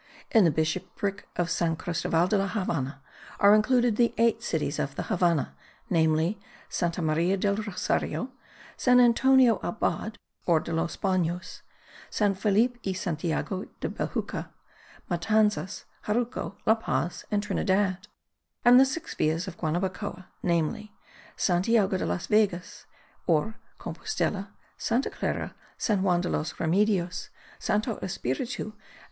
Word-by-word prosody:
In 220 -5 +6
the - - +6
bishopric 180 +5 -2
of 175 -1 0
San 165 -1 +1
Cristoval 165 0 0
de 210 - +1
la 195 0 +2
Havannah 145 - -2 0.4
are 200 0 +7
included 240 +1 +3
the 235 -1 +3
eight 230 0 +3
cities 160 -9 -1
of 140 0 -2
the - - -3
Havannah, 170 -4 +1 0.4
namely: 160 +3 +2 0.3
Santa 170 0 -1
Maria 165 +5 +2
del 200 +1 +1
Rosario, 215 +4 -2 0.4
San 250 -1 +4
Antonio 250 0 +5
Abad 220 0 -2 0.3
or 170 -3 +5
de 165 - -5
los 165 +1 -1
Banos, 180 -2 -1 0.5
San 205 -2 +2
Felipe 220 +5 +2
y 190 - -1
Santiago 180 +1 -2
del - - -3
Bejucal, - - -3 0.6
Matanzas, 210 +2 +1 0.2
Jaruco, 230 -1 -1
La 220 - +6
Paz 175 -7 -2
and 205 -1 0
Trinidad, 190 -1 0 0.6
and 245 +1 +9
the 265 - +7
six 320 +5 -4
villas 160 +4 0
of 185 - -6
Guanabacoa, 185 +3 -3 0.2
namely: 175 +5 0 0.4
Santiago 195 +2 +2
de 185 - -1
las 175 - -2
Vegas 200 -5 0 0.4
or 170 +7 +1 0.2
Compostela, 205 - -3 0.3
Santa 240 +4 0
Clara, - - -3 0.2
San 205 -4 +1
Juan 180 -2 +2
de 180 - -2
los 155 - -1
Remedios, 180 +1 +1 0.3
Santo 215 +2 0
Espiritu 195 - -3
and - - -27
S. 210 - -30
190 Hz, 135 wpm, -27 LUFS, 170-215 Hz, 0.6 s, and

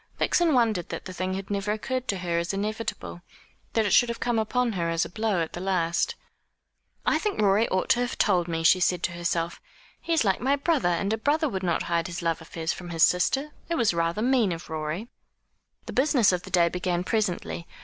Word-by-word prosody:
Vixen 335 -5 +2
wondered 220 -8 +1
that - - -6
the 185 - -7
thing 185 +1 -2
had 195 +1 -6
never 200 0 -1
occurred 255 +4 -3
to 200 - -1
her 170 -2 -1
as 170 +3 -2
inevitable 200 - -4 0.5
that 225 -1 +2
it 205 - +1
should 245 - +5
have 235 - -4
come 240 -2 0
upon 245 +2 0
her 170 -5 -1
as 165 0 +1
a - - -8
blow 210 -3 0
at 160 - -7
the - - -5
last. 185 - 0 0.9
"I - - +3
think 420 -2 -2
Rorie 210 +2 +3
ought 185 - -1
to 240 - +4
have 245 +1 -2
told 180 -4 +2
me," 165 -1 -2
she 185 +3 +5
said 180 -1 +1
to - - 0
herself. 170 0 -2 0.4
"He - - -5
is 320 -8 +3
like 190 -2 +1
my 270 +3 +2
brother; 285 - +1
and 195 +5 0
a 220 - -2
brother 310 +6 +1
would 195 -8 -3
not 175 -3 0
hide 170 -1 -1
his 175 0 -6
love 165 -1 0
affairs 160 0 -3
from 175 -1 -9
his 165 -1 +2
sister. 270 +11 +2 0.2
It 340 - 0
was 230 - +2
rather 170 +5 0
mean 245 -6 +3
of 165 -1 -6
Rorie." 155 +7 -3 0.8
The - - -7
business 260 -6 +4
of 180 -1 -1
the 190 - -11
day 175 -2 +4
began 180 0 -1
presently. 185 -4 -2
190 Hz, 225 wpm, -26 LUFS, 170-230 Hz, 0.9 s, should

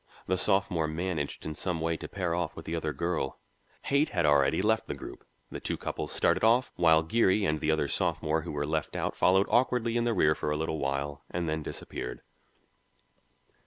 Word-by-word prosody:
The 95 - +1
sophomore 95 -3 +1
managed 80 -2 -3
in 80 - -3
some 85 +2 -2
way 80 +1 0
to - - -7
pair 90 -4 -2
off 85 -2 -2
with 80 - -9
the 85 - -3
other 80 -2 -2
girl; 85 -5 -2 0.4
Haight 140 +3 +2
had 85 -4 0
already 70 -2 +4
left - - +1
the - - -3
group; - - -9 0.3
the - - -5
two - - -3
couples - - -4
started - - +1
off, 120 +4 +3
while 80 -2 +5
Geary 100 +2 +2
and 75 -2 +1
the 80 - -1
other 80 -2 +2
sophomore 80 +2 0
who 85 - -6
were 75 0 -2
left 80 +1 -2
out - - -2
followed 95 +2 +4
awkwardly 120 -2 +2
in 120 - +1
the 120 -1 +1
rear 80 -4 +4
for 75 - -3
a 75 - 0
little 80 0 -2
way 70 +1 -2
and 85 -1 -2
then 80 0 -1
disappeared. - - -6
80 Hz, 200 wpm, -29 LUFS, 75-95 Hz, 0.4 s, while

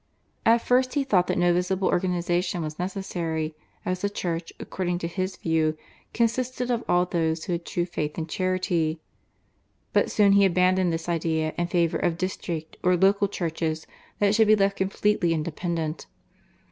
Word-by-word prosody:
At 230 +1 +5
first 255 +2 +2
he 285 - +2
thought 190 -9 +2
that - - 0
no 175 0 +4
visible 180 +2 0
organisation 175 -1 0
was 155 0 -6
necessary, 170 -4 -3 0.3
as 180 0 -2
the 200 - 0
Church, 170 -4 -3
according 180 -2 -2
to 170 - -3
his 185 +2 -3
view, 160 -1 0 0.3
consisted 250 +2 0
of 235 -1 0
all 175 0 +4
those 165 -2 -1
who 180 - -2
had 170 0 -4
true 175 - -1
faith 150 -4 -4
and 160 -1 -3
charity. 180 -3 0 0.9
But - - +3
soon 205 -2 +4
he 200 0 +6
abandoned 185 -1 +3
this 165 0 -3
idea 160 -2 0
in 175 - -1
favour 170 -2 +1
of 170 -2 0
district 170 -3 -4
or 180 0 +3
local 200 +2 +3
churches 165 -4 -3 0.3
that 205 0 +3
should 220 0 +4
be 215 - +7
left 195 -1 +1
completely 190 -3 +1
independent. 160 0 -3
175 Hz, 165 wpm, -25 LUFS, 165-195 Hz, 0.9 s, be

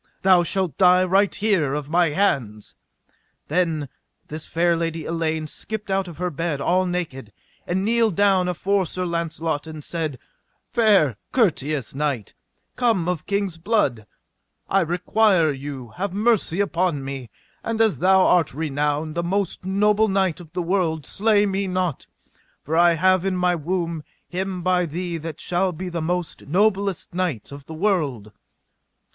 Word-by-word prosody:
thou 185 -2 +6
shalt 180 -3 0
die 180 -1 +6
right 195 +2 +2
here 185 -10 +1
of 150 -2 -4
my 170 +1 +3
hands. 135 - -1 0.8
Then 160 -3 0 0.4
this 155 +1 -5
fair 170 +1 +2
lady 165 -1 -3
Elaine 160 -1 -1
skipped 210 +6 -5
out 190 -1 0
of 170 -4 -9
her 180 +1 -2
bed 165 -1 -2
all 180 +6 +2
naked, 150 -10 -4 0.4
and 190 +2 0
kneeled 225 -3 +2
down 195 -2 +3
afore 190 +1 0
Sir 185 +2 -3
Launcelot, 165 -3 -2
and 155 -2 -8
said: 155 -5 -3 0.5
Fair 195 - +3
courteous 155 - 0
knight, 135 -7 -2 0.4
come 225 -9 +2
of 180 -4 -2
king's 200 -4 -1
blood, 145 - 0 0.6
I 195 - +3
require 175 0 +2
you 135 -3 -7
have 190 0 -2
mercy 210 -5 +2
upon 175 -7 0
me, 135 -3 -6 0.3
and 225 -1 -2
as 220 -3 +3
thou 190 +1 +5
art 165 -7 +3
renowned 150 0 -1
the 170 - -1
most 185 +1 -2
noble 210 +3 +3
knight 190 -4 +1
of 165 -3 -13
the 180 -1 -2
world, 165 -4 0
slay 210 +3 +2
me 195 0 -1
not, 185 -5 -2 0.6
for 155 - -2
I 170 0 +5
have 185 +2 +3
in 190 -1 0
my 180 0 +2
womb 170 0 -2 0.3
him 185 0 -3
by 180 -1 +2
thee 170 +2 -3
that 160 -1 -7
shall 180 +1 0
be 180 +2 -6
the 170 -1 -3
most 175 0 -3
noblest 195 +2 +1
knight 175 - -2
of 140 -1 -10
the 160 - -7
world. 155 - -1
175 Hz, 155 wpm, -23 LUFS, 155-190 Hz, 0.8 s, thou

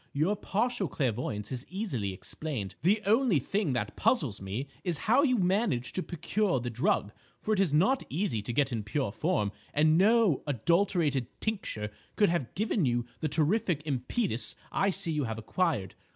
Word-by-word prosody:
Your 160 +9 +2
partial 220 0 -1
clairvoyance 115 -7 -2
is 125 -1 -3
easily 165 - -2
explained. 100 +2 -5
The 205 +6 +3
only 225 - +4
thing 180 - 0
that 125 - -2
puzzles 155 - +1
me 105 +8 -4 0.2
is 175 -4 -1
how 245 +6 +5
you 255 -4 +3
managed 185 - +1
to 185 - -1
procure 185 -1 0
the 120 0 -4
drug, 125 - +1 0.3
for 215 - 0
it 205 - +1
is 195 -6 +3
not 190 - +3
easy 165 - -1
to 105 - -4
get 135 +2 +1
in 115 -3 -1
pure 110 +2 -2
form, 115 - 0 0.2
and 155 +2 +4
no 215 - +4
adulterated 150 - +1
tincture 110 - -3 0.2
could 205 - +4
have 165 -8 -2
given 210 -1 +1
you 120 -3 +1
the 155 - -1
terrific 160 +1 +1
impetus 135 - -1 0.2
I 195 - +2
see 170 -3 -2
you 150 -3 0
have 110 -1 -4
acquired. 115 - -1
155 Hz, 170 wpm, -30 LUFS, 120-200 Hz, 0.3 s, how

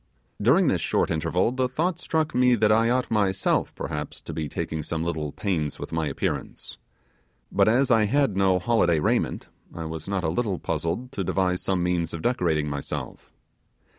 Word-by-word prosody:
During - - +4
this - - +1
short - - +1
interval, 90 +7 +1
the 130 0 0
thought 165 +6 -1
struck 160 -2 -1
me 125 0 +4
that 105 -1 +3
I 115 +2 +4
ought 125 0 0
myself 100 -3 +1
perhaps 75 0 -5
to 80 - -7
be 75 -1 -3
taking 80 +3 -3
some 80 +1 -3
little 80 -3 -2
pains 80 -7 -2
with - - -7
my 80 -1 -1
appearance. 70 - -4 0.7
But 100 0 +3
as 125 +4 +3
I 110 -2 +5
had 135 -1 +2
no 95 -1 +3
holiday 90 -4 +2
raiment, - - 0 0.3
I 80 - -5
was 80 +2 -6
not 95 -2 -1
a 80 - +1
little 100 +2 -1
puzzled 90 - -3
to 100 -7 -3
devise 90 0 0
some 95 -2 0
means 85 -2 0
of 80 - -7
decorating 85 -11 +1
myself. 70 -1 -5
95 Hz, 180 wpm, -25 LUFS, 80-115 Hz, 0.7 s, I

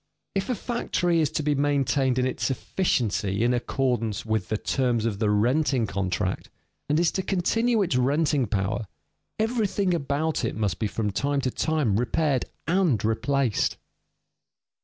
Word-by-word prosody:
If 195 +3 -2
a 250 - +1
factory 175 -7 0
is 150 - +2
to 155 - -1
be 150 0 +2
maintained 140 -2 +1
in 130 - +2
its 130 - -1
efficiency 115 - 0
in 120 +1 +3
accordance 120 -3 -1
with 110 -4 -1
the 110 - 0
terms 120 -1 0
of 105 -4 -1
the 105 -2 +2
renting 125 +4 +2
contract, 95 -1 -2 0.4
and 150 +2 +3
is 170 -1 +3
to 190 - -1
continue 220 +5 +1
its 165 -9 0
renting 140 0 +2
power, 100 +1 -1 0.5
everything 215 -4 0
about 150 -1 -1
it 115 - -1
must 105 -4 -1
be 110 - 0
from 105 0 -2
time 140 +7 0
to 130 - -1
time 150 -11 +1
repaired 135 +2 +1 0.2
and 165 - +2
replaced. 125 +2 +1
130 Hz, 155 wpm, -26 LUFS, 110-160 Hz, 0.5 s, in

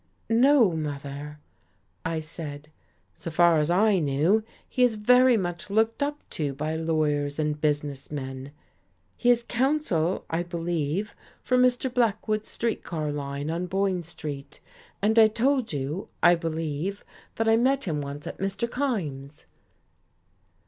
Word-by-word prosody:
"No, 245 -2 +5
mother," 145 -1 -5 0.7
I 165 -1 -2
said. 155 -2 -8 0.4
"So 165 - -7
far 170 0 +4
as 150 +1 +1
I 195 +2 +4
knew, 160 +9 +2 0.2
he 255 - -2
is 245 -3 +4
very 250 +3 +5
much 175 -1 -4
looked 220 +5 +1
up 290 +1 -2
to 145 -4 -2
by 155 +3 -2
lawyers 150 -3 0
and 150 -1 -1
business 145 -2 -1
men. 135 -1 -6 0.6
He 245 - +1
is 240 -1 +4
counsel, 235 - 0
I 165 +1 -1
believe, 170 +2 -2 0.3
for 255 - +1
Mr. 250 0 +2
Blackwood's 215 -3 0
street 230 -1 -2
car 155 -3 -3
line 145 +1 -4
on 175 +2 -2
Boyne 190 -1 0
Street. 150 -4 -7 0.4
And 220 +2 +4
I 220 - +8
told 245 +3 +1
you, 145 +5 -3 0.2
I 175 - +8
believe, 165 +2 -3 0.3
that 225 - 0
I 225 - +6
met 265 +4 +2
him 155 -5 -2
once 140 +1 -6
at - - -7
Mr. 195 +4 -1
Kyme's." 160 - -3
170 Hz, 140 wpm, -26 LUFS, 150-225 Hz, 0.7 s, I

